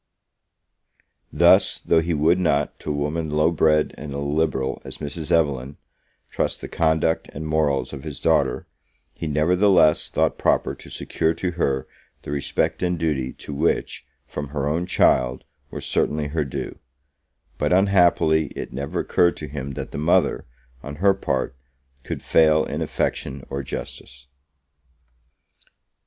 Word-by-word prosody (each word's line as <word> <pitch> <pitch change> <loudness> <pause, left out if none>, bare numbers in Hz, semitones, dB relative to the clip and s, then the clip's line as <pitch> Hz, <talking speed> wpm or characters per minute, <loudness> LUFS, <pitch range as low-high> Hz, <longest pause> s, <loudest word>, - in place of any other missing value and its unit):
Thus, - - +5
though 80 - +2
he 85 0 -1
would 80 +5 +3
not, 75 -5 0
to - - -7
a 75 - 0
woman 75 +2 -2
low 75 +2 +2
bred 75 -2 +2
and 75 -1 -7
illiberal 70 -1 -1
as - - -6
Mrs. 75 +2 -6
Evelyn, 70 -4 +1 0.5
trust - - -1
the - - -7
conduct 80 0 +1
and 80 +2 -6
morals 75 -3 0
of 65 - -7
his 75 -3 -6
daughter, - - +1 0.5
he 80 - -5
nevertheless 85 +2 +3
thought - - 0
proper - - +1
to - - -12
secure 80 +1 -1
to 90 - -2
her 70 -6 -1 0.4
the - - -6
respect 70 -1 -1
and 90 -1 0
duty 75 -6 -1
to 75 - -9
which, 80 +4 -1 0.2
from 75 -1 -6
her 70 0 -3
own 85 +4 -1
child, 65 -7 +2 0.3
were - - -6
certainly 75 -1 -1
her 75 0 -1
due; 70 0 -6 0.8
but - - 0
unhappily, 90 -5 +4
it - - -6
never 70 +2 -3
occurred 85 -1 +2
to 75 - -6
him 70 -1 -6
that - - -6
the 70 - -5
mother, 80 +3 +2 0.3
on 70 0 -7
her 100 +6 +4
part, 65 -8 -2 0.5
could - - -5
fail 80 -1 +4
in - - -4
affection 65 0 -2
or 70 - -2
justice. 70 0 -7
75 Hz, 145 wpm, -23 LUFS, 70-80 Hz, 0.8 s, Thus